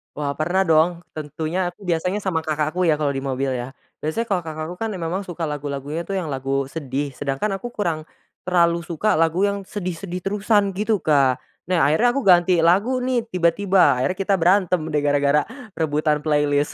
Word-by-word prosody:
Wah, 145 -1 -2
pernah 180 +5 +2
dong, 170 +1 +2
tentunya 155 +3 -4
aku 205 - -28
biasanya 180 +5 0
sama 175 -4 0
kakakku 155 +3 0
ya, 155 - +4
kalau 145 -2 +1
di 135 - -3
mobil, 135 0 -1
ya. 125 +1 -4 0.3
Biasanya 160 +10 -2
kalau 180 -4 0
kakakku 155 +2 -5
kan 225 0 -2
memang 180 +2 -3
suka 175 -1 -6
lagu 145 0 -4
lagunya 145 +4 -4
tuh, 195 - -3
yang 175 -5 -2
lagu 135 0 -2
sedih, 140 -2 -3
sedangkan 145 +9 -2
aku 240 - -6
kurang 165 -6 -2 0.4
terlalu 170 -1 +3
suka 175 +4 0
lagu 165 +4 +2
yang 200 -1 -1
sedih-sedih 180 -2 -5
terusan, 205 0 +1
gitu, 210 +2 0
Kak. 140 -4 +3 0.3
Nah, 180 -5 +2
akhirnya 160 - +3
aku 275 - +1
ganti 180 -1 +5
lagu 200 +10 +3
nih, 245 -3 0
tiba 175 -4 +2
tiba, 190 -9 +3
akhirnya 185 +8 0
kita 195 0 0
berantem 180 0 +3
deh 150 -1 0
gara-gara 145 0 +3 0.3
rebutan 150 -1 +1
playlist, 145 -1 +1
165 Hz, 185 wpm, -22 LUFS, 150-190 Hz, 0.4 s, ganti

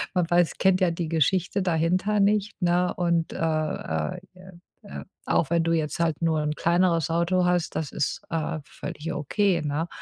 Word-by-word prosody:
Man 175 -2 +1
weiß 175 -1 +3
kennt 190 -1 +3
ja 185 - +4
die 165 0 -3
Geschichte 180 +5 +1
dahinter 185 +4 +1
nicht, 205 +1 +1
ne? 175 +1 +2
Und, 170 -2 0
äh - - -6
äh 160 +3 -2 0.2
äh 185 +1 -14 0.3
äh, 200 - -8 0.2
auch 155 - +1
wenn 170 0 +2
du 165 - 0
jetzt 155 -1 -1
halt 165 -2 0
nur 160 -2 +1
’n 150 0 -2
kleineres 170 -2 +2
Auto 170 +2 +1
hast, 180 -1 0
das 155 -3 -3
ist, 140 - -2
äh, 160 0 -2
völlig 165 +2 -6
okay, 185 +3 0
ne? 150 +3 -2
170 Hz, 180 wpm, -25 LUFS, 160-185 Hz, 0.3 s, ja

